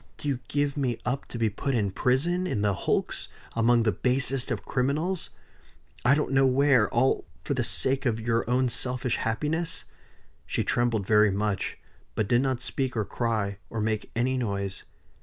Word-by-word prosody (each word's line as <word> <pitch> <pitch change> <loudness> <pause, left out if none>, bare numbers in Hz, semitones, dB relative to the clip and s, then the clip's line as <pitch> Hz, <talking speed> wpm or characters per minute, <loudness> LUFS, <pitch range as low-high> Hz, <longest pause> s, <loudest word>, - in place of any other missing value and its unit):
Do - - -6
you 135 -3 0
give 145 -1 0
me 125 -5 0
up 135 +3 -2
to - - -7
be 115 -1 +2
put 135 +6 -2
in 100 -4 +1
prison 165 - +1
in 105 - -1
the 100 -1 +2
hulks - - -1 0.3
among 115 +1 +4
the 110 - +3
basest 130 +5 +1
of - - -3
criminals 150 +8 -1 0.7
I 125 +3 +5
don't 150 - -1
know 135 0 +4
where 130 -4 +4
all 130 +3 +1 0.2
for - - -1
the - - 0
sake 135 0 +1
of 115 -2 0
your 115 0 0
own 130 +1 +3
selfish 125 +1 0
happiness?" 150 +9 -2 0.6
She - - -1
trembled 120 -4 +1
very 105 +1 +5
much; 100 0 -1 0.4
but 110 - 0
did 120 +3 +3
not 130 -2 -1
speak 130 -2 -2
or 110 - 0
cry, 105 -2 -2
or 115 - -4
make 110 0 -1
any 130 +2 +1
noise. 100 -4 -3
120 Hz, 175 wpm, -27 LUFS, 110-135 Hz, 0.7 s, I